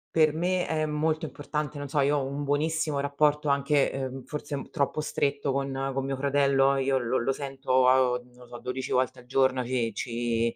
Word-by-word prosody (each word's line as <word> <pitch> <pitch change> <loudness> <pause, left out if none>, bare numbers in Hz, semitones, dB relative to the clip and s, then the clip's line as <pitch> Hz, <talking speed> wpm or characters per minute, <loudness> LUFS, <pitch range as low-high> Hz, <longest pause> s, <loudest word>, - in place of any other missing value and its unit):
Per 155 -2 +5
me 180 +3 0
è 155 -1 0
molto 155 +1 0
importante. 150 -1 -4
Non 145 -1 -6
so, 145 - 0
io 145 +1 +3
ho 135 - -1
un 140 +2 -4
buonissimo 150 +1 0
rapporto 145 +1 +1
anche, 140 0 +2 0.2
uhm, 130 0 -8
forse 150 -1 -5
un 140 - -6
troppo 145 0 0
stretto 140 -2 -1
con 135 0 -2
con 135 0 -2
mio 135 0 -2
fratello, 140 0 +3
io 135 0 +1
lo 125 0 0
lo 125 +3 0
sento, 135 -2 -1
uhm, 125 -1 +3
non - - -25
lo 125 0 -16
so, 120 0 -9
12 125 +1 -4
volte 130 0 +1
al 125 - -16
giorno 130 0 +2
ci 120 -3 -1
ci 115 -1 -1
140 Hz, 205 wpm, -27 LUFS, 130-145 Hz, 0.2 s, Per